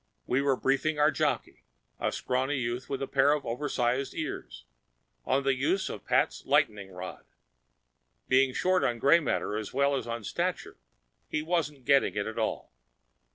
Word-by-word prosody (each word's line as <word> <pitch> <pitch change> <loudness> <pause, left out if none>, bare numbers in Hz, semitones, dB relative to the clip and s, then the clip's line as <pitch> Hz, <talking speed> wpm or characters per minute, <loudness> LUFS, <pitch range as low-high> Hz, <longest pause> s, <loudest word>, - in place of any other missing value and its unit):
We 130 +2 +1
were 140 -1 +2
briefing 140 +4 0
our 150 +1 +4
jockey—a - - -3
scrawny 130 +3 -1
youth 120 0 -3
with 135 -1 -2
a - - -3
pair 140 +2 +4
of 150 -1 -2
oversized 125 +1 -1
ears—on - - -5
the 135 0 +3
use 145 +9 0
of - - -8
Pat's - - +1
lightening 100 -2 +1
rod. 90 0 -8 1.0
Being 130 0 +4
short 185 +7 +1
on 120 -1 +1
gray 140 +8 +5
matter 125 -8 -1
as 110 +2 -6
well 140 +1 +3
as 130 - -3
on 115 -1 -4
stature, - - -3 0.5
he 150 - -2
wasn't 155 -5 -2
getting 140 -5 +3
it 100 -1 -1
at 110 +1 -4
all. 110 - -3
135 Hz, 155 wpm, -29 LUFS, 115-145 Hz, 1.0 s, gray